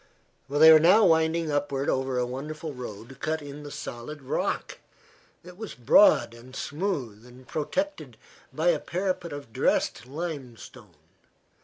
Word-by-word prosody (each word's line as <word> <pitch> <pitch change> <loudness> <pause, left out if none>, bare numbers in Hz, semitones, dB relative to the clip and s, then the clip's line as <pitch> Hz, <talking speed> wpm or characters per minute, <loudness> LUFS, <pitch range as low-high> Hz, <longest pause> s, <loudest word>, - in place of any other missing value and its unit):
They 155 +3 +7
were 155 - +8
now 185 +7 +6
winding 160 0 +2
upward 145 -1 -1
over 130 -1 0
a 125 - +1
wonderful 150 +5 -6
road 125 +1 -9
cut 160 0 -1
in 145 0 -9
the 145 - -8
solid 140 +2 -7
rock. 130 - -2 0.6
It 180 +1 -13
was 220 0 -7
broad 125 - +5
and 125 +3 -13
smooth 145 - -3
and 125 +1 -16
protected 285 - -3 0.3
by - - +1
a - - +2
parapet 180 -2 -3
of 145 -6 -9
dressed 125 - 0
limestone. 140 -5 -8
145 Hz, 140 wpm, -27 LUFS, 125-165 Hz, 0.6 s, were